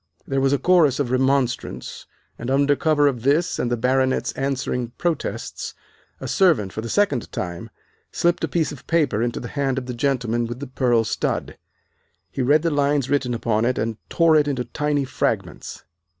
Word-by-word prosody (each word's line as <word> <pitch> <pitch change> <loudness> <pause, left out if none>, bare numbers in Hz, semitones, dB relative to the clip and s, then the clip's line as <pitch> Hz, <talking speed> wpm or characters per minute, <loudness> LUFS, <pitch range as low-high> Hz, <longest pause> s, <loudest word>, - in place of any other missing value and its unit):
There 135 -1 -1
was 135 0 +2
a 140 - +3
chorus 160 -5 +3
of 130 -4 -1
remonstrance, 130 -1 -1 0.3
and 120 - -4
under 140 +2 +3
cover 150 0 +2
of 125 -5 -1
this 145 +7 +1
and 120 - 0
the 120 - 0
Baronet's 130 +2 +1
answering 130 -3 -2
protests 170 -2 -3 0.4
a - - -6
servant 160 - +2
for 110 - -4
the 115 - -6
second 170 - +1
time 85 -2 -5 0.4
slipped 175 -1 +1
a - - +2
piece 160 +1 0
of 145 - -11
paper 155 -10 +1
into 120 0 -1
the 120 - -7
hand 135 -2 -1
of 130 - -3
the 125 - -5
gentleman 120 -2 0
with 120 +1 -6
the 140 - -5
pearl 125 -3 +1
stud. 110 - -2 0.8
He - - -3
read 145 +5 +3
the 165 - +1
lines 145 -2 +1
written 130 -4 +1
upon 115 -1 0
it 125 +2 +1
and 110 -1 -2
tore 165 -2 +4
it 150 -1 +4
into 130 -4 -1
tiny 145 +2 -1
fragments. 130 - -3
135 Hz, 185 wpm, -22 LUFS, 120-145 Hz, 0.8 s, tore